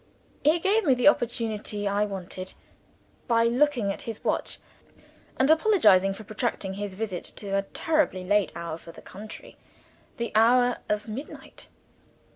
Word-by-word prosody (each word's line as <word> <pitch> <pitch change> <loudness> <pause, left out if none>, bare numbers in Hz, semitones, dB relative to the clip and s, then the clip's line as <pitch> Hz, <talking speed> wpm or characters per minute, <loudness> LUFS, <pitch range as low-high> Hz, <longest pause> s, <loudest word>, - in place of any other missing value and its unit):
He 310 +3 +4
gave 400 +6 +2
me 270 -6 +4
the 250 +3 +2
opportunity 220 -5 0
I 200 +1 +1
wanted, 185 -2 -7 0.7
by 230 -2 +3
looking 240 -3 +2
at - - -9
his 225 -2 -7
watch, - - -1 0.8
and 265 - +3
apologizing 315 - +5
for 220 - -10
protracting 215 -2 -3
his 200 -1 -5
visit 200 -4 -4
to 200 - -6
a 195 - +2
terribly 285 - 0
late 205 +1 +2
hour, 165 -1 -5
for 165 - -12
the - - -14
country 210 +3 -11 0.6
the 235 0 -3
hour 245 +3 +4
of 210 +1 -1
midnight. 240 +7 -9
215 Hz, 145 wpm, -26 LUFS, 195-250 Hz, 0.8 s, apologizing